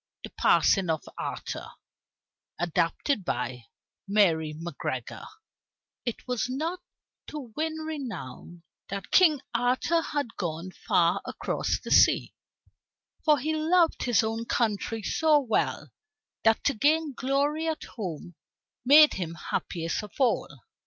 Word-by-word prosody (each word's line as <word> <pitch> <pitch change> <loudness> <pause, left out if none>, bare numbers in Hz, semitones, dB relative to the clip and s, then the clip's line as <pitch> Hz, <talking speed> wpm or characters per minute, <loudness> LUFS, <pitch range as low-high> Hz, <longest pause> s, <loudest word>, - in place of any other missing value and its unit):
THE - - -8
PASSING 190 -4 +3
OF 160 -2 0 0.2
ARTHUR - - -5 0.9
ADAPTED 175 - 0
BY 125 -4 -3 0.4
MARY 165 -7 +2
MACGREGOR 145 -7 -5 0.8
It 235 +1 -4
was 250 0 -1
not 320 +8 -2 0.5
to 270 -7 -8
win 315 +1 -1
renown 235 - -7 0.3
that 200 -1 -6
King 315 -7 +5
Arthur 250 +8 +1
had 290 -7 -3
gone 170 0 -4
far 175 +1 +1
across - - -2
the - - -8
sea, - - +5 0.9
for 305 -1 +5
he 305 +4 -1
loved 330 +2 +2
his 240 -3 +3
own 225 +1 -2
country 225 -1 -1
so 310 +6 +3
well, 245 -6 -1 0.5
that 225 0 +3
to 285 - +2
gain 300 +5 +2
glory 285 +5 0
at 320 -1 -2
home 175 -5 -7 0.5
made 295 +4 +8
him 170 -3 -4
happiest 165 +2 -3
of 210 - -10
all. 260 -3 +1
235 Hz, 120 wpm, -27 LUFS, -, 0.9 s, made